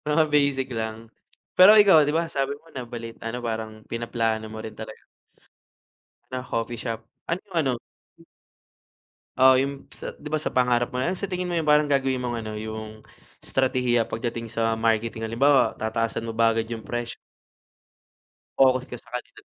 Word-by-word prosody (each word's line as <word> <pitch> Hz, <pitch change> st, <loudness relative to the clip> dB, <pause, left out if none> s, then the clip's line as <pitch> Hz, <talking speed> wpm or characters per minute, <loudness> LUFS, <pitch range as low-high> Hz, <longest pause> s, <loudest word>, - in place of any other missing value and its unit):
mga 160 Hz, 0 st, +5 dB
basic 140 Hz, -2 st, +2 dB
lang. 110 Hz, 0 st, -3 dB, 0.6 s
Pero 185 Hz, +3 st, +10 dB
ikaw 195 Hz, -5 st, +7 dB
di 150 Hz, -, +1 dB
ba, -, -, +1 dB
sabi 140 Hz, -2 st, -1 dB
mo, 165 Hz, -, -24 dB
nabalit 120 Hz, -3 st, -7 dB
ano 115 Hz, +2 st, -3 dB
parang 110 Hz, -1 st, -3 dB, 0.2 s
pinaplano 115 Hz, -1 st, -1 dB
mo 110 Hz, -, -7 dB
rin 110 Hz, -, -8 dB
talaga -, -, -9 dB, 1.3 s
na 130 Hz, 0 st, -3 dB
coffee 115 Hz, 0 st, -3 dB
shop. 115 Hz, -1 st, -4 dB, 0.2 s
Anong 185 Hz, +4 st, -4 dB
ano 145 Hz, -6 st, +2 dB, 1.7 s
Oo, 130 Hz, 0 st, +7 dB
yung 140 Hz, 0 st, -5 dB
p -, -, -17 dB
sa, -, -, -6 dB
di 150 Hz, -, -7 dB
ba, 155 Hz, -, +1 dB
sa 155 Hz, -, -4 dB
pangarap 125 Hz, -1 st, +2 dB
mo, 125 Hz, -, -1 dB
ano 180 Hz, +7 st, -1 dB
sa -, -, -3 dB
tingin 180 Hz, -2 st, -3 dB
mo 175 Hz, -, -1 dB
yung 160 Hz, -, 0 dB
parang 150 Hz, 0 st, +4 dB
gagawin 135 Hz, -2 st, +1 dB
mong 120 Hz, -1 st, -2 dB
ano, 110 Hz, -, -4 dB
yung 110 Hz, 0 st, -6 dB, 0.4 s
estratehiya, 125 Hz, -3 st, +1 dB
pagdating 115 Hz, +1 st, -4 dB
sa 115 Hz, -1 st, +1 dB
marketing, 115 Hz, 0 st, 0 dB
halimbawa 135 Hz, +5 st, +3 dB
tataasan 115 Hz, +1 st, -2 dB
mo 115 Hz, -, -6 dB
ba 115 Hz, 0 st, +4 dB
agad 115 Hz, 0 st, -2 dB
yung 115 Hz, -2 st, -6 dB
presyo? 120 Hz, -1 st, -4 dB, 1.4 s
Focus 130 Hz, -1 st, +4 dB
ka 125 Hz, -, -6 dB
sa -, -, -21 dB
kalidad? 125 Hz, -, -7 dB
120 Hz, 170 wpm, -25 LUFS, 115-140 Hz, 1.7 s, Pero